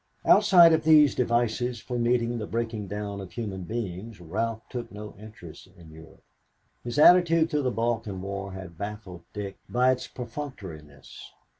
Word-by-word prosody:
Outside 185 -5 +7
of 160 - +1
these 155 -2 +6
devices 120 0 0
for 125 +1 -5
meeting 120 0 +1
the 105 - -5
breaking 115 -3 -3
down 100 0 -5
of 95 - -10
human 100 -6 -5
beings, 105 0 -6
Ralph 110 +6 -4
took 120 -5 -6
no 105 +1 -9
interest 105 -6 -12
in 80 -2 -15
Europe. 80 +1 -15 0.6
His 120 +3 -5
attitude 165 0 +5
through 150 - +1
the 130 - 0
Balkan 115 -4 -2
War 100 0 -5
had 95 -3 -10
baffled 100 -4 -7
Dick 100 -2 -7
by 125 +1 +3
its 130 - -3
perfunctoriness. 100 - -9
115 Hz, 155 wpm, -26 LUFS, 100-125 Hz, 0.6 s, Outside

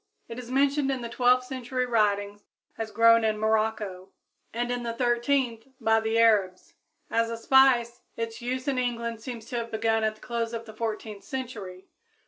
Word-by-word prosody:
It 230 +1 -7
is 245 -1 -9
mentioned 275 +1 +2
in 265 -2 -1
the 235 - -5
twelfth 250 +1 +3
century 255 -1 -3
writings 205 -3 0 0.3
as 225 -1 -4
grown 230 0 +5
in 215 -1 +1
Morocco, 215 -3 -1 0.4
and 240 +1 -2
in 245 0 -2
the 235 -1 -3
thirteenth 240 0 0
by 225 0 +3
the 220 +1 -1
Arabs. 205 -5 +2 0.4
As 230 0 +1
a 230 - -4
spice, 245 -1 +4 0.2
its 230 0 -4
use 255 +3 -3
in 270 -2 +1
England 235 -2 -2
seems 230 -2 -7
to 245 - -2
have 230 -1 -3
begun 225 0 0
at 215 0 0
the 215 - -23
close 235 -1 -3
of 230 0 -5
the 220 - -11
fourteenth 215 -2 -5
century. 210 -9 -6
230 Hz, 180 wpm, -27 LUFS, 220-245 Hz, 0.4 s, grown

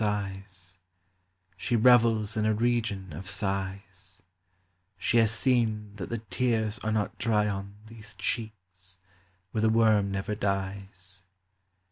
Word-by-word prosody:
sighs, 95 -3 -4 0.8
She 110 +6 -1
revels 115 -2 +4
in 110 - 0
a 110 - +2
region 110 -6 0
of 90 +5 -7
sighs: 95 -1 -4 0.8
She 105 +6 +1
has 115 -2 +5
seen 115 -4 +1
that 100 - -5
the 115 - -2
tears 110 0 -1
are 110 - -2
not 110 -1 -1
dry 105 -2 +2
on 100 0 -4
These 110 -2 -11
cheeks, 95 -3 -5 0.5
where 110 - -1
the 110 - +4
worm 110 -3 +4
never 100 +2 -2
dies. 95 -2 -4
105 Hz, 125 wpm, -28 LUFS, 95-110 Hz, 0.8 s, has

